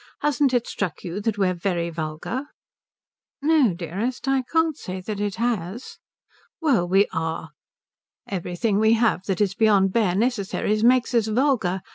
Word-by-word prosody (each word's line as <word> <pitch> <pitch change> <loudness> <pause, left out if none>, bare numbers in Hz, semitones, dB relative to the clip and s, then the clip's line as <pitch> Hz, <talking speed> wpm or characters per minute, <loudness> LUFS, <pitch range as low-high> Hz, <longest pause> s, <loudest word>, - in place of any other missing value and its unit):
Hasn't 285 -2 +2
it 245 -2 +1
struck 190 -5 -4
you 180 +3 -4
that 215 0 -1
we're 190 -2 +2
very 170 -1 -2
vulgar?" 160 - -4 0.9
"No, 285 - +3
dearest, 195 - -4
I 270 -1 +2
can't 325 -2 +2
say 185 -9 -6
that 205 +2 -5
it 205 -1 -2
has." 230 -1 -3 0.6
"Well, 260 - +2
we 195 +3 +4
are. 160 -1 -3 0.8
Everything 195 +3 -1
we 220 +1 +4
have 225 -5 +2
that 195 0 -1
is 200 -2 +2
beyond 195 -3 +3
bare 205 -6 +2
necessaries 215 -1 0
makes 250 +1 +4
us 230 -2 +2
vulgar. 220 -6 +1
210 Hz, 150 wpm, -23 LUFS, 185-245 Hz, 0.9 s, we